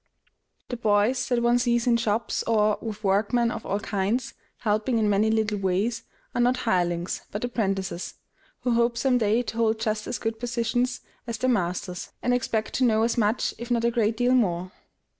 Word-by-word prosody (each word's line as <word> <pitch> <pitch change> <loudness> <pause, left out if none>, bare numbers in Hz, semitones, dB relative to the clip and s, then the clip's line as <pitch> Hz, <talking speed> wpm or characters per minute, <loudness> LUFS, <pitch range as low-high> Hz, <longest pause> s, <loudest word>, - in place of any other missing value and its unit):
The 245 - -3
boys 215 +3 +2
that 240 -2 +1
one 240 +1 +4
sees 240 -1 +1
in 240 -2 +4
shops, 225 0 -1
or, 215 -2 +2
with 215 -1 -6
workmen 220 +4 +2
of - - -6
all 200 - 0
kinds, 205 +4 -1 0.3
helping 215 +3 +1
in 220 -1 +2
many 205 +2 +3
little 220 -2 0
ways, 195 +5 0 0.3
are 245 - +1
not 250 +1 +3
hirelings, 175 -4 0
but 205 - -5
apprentices, 195 -7 -2 0.5
who 250 - 0
hope 235 0 +2
some 250 +1 +2
day 220 +2 +2
to 230 - -6
hold 225 -1 +2
just 215 -1 -2
as - - -2
good 225 +1 -3
positions 245 +1 -1 0.3
as 230 -2 -3
their 255 +1 +1
masters, 180 -3 -2
and 245 - +2
expect 225 -3 -1
to 260 - +1
know 220 -2 +3
as 230 - +1
much, 220 0 +1
if 235 +1 -7
not 235 -1 +1
a 235 - +3
great 225 -2 +1
deal 245 +1 +3
more. 185 -7 +1
225 Hz, 190 wpm, -26 LUFS, 205-240 Hz, 0.5 s, one